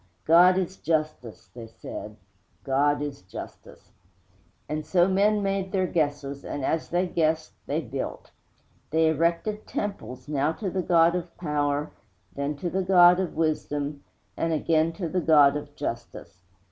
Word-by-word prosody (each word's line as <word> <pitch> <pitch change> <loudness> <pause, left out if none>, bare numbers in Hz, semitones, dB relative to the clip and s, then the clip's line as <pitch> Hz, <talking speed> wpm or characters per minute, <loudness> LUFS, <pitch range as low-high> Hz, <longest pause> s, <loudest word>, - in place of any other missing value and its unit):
'God 175 +3 +6
is 190 0 -2
Justice,' 155 -7 -3
they 115 -2 -9
said, 105 -1 -9 0.5
'God 145 +4 +1
is 145 -1 -6
Justice!' 95 +1 -11 0.8
And 155 0 -3
so 175 +3 +3
men 205 +2 +2
made 195 -1 -1
their 190 -2 +1
guesses, 145 -4 -2
and, 140 - -4
as 160 - -1
they 175 +2 +1
guessed, 160 -2 0 0.2
they - - -1
built. - - -6 0.6
They 160 +1 +3
erected 170 +7 -1
temples, 195 -12 -5
now 150 +1 0
to 195 +1 -4
the 185 - -1
God 170 -1 +4
of 175 -1 -5
Power, 150 -2 -1 0.4
then 140 +1 -2
to 175 +4 -3
the 190 - 0
God 180 -1 +6
of 185 -3 -3
Wisdom, 145 -2 -2 0.3
and 165 - -1
again 160 +1 +2
to 175 -1 -4
the 180 +3 -1
God 145 -3 +5
of 145 0 -6
Justice. 115 -5 -6
160 Hz, 150 wpm, -26 LUFS, 145-180 Hz, 0.8 s, God